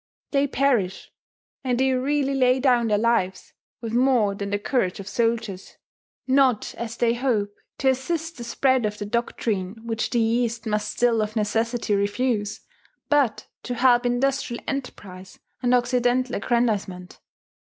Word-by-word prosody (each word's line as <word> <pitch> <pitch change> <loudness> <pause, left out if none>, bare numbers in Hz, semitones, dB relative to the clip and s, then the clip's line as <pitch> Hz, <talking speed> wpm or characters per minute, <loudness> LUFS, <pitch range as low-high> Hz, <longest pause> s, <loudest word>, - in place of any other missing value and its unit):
They 280 0 +2
perish; 245 -10 0 0.5
and 250 -2 0
they 265 0 +3
really 275 +2 0
lay 255 -1 +3
down 250 -3 +3
their 210 -1 +2
lives, 205 -4 0 0.3
with 230 -2 -5
more 240 -5 +3
than 200 0 -5
the 205 - 0
courage 205 -3 -1
of 195 - -8
soldiers, 225 -4 -2 0.5
not, 260 -4 +2
as 230 0 -6
they 235 -1 +2
hope, 235 -5 0 0.2
to 265 - +2
assist 325 +6 -2
the 240 - -6
spread 255 0 +1
of 210 0 -6
that 205 0 -6
doctrine 220 -4 -2
which 225 -1 -2
the 240 - +1
East 230 0 0
must 210 -1 -1
still 235 -2 +2
of 215 +1 -3
necessity 225 +1 0
refuse, 205 +1 -1 0.5
but 285 -6 +2 0.2
to 245 - -4
help 245 0 +4
industrial 245 0 -1
enterprise 190 -9 -6 0.2
and 250 0 +3
Occidental 245 0 +1
aggrandizement. 200 -6 -1
235 Hz, 145 wpm, -24 LUFS, 210-255 Hz, 0.5 s, help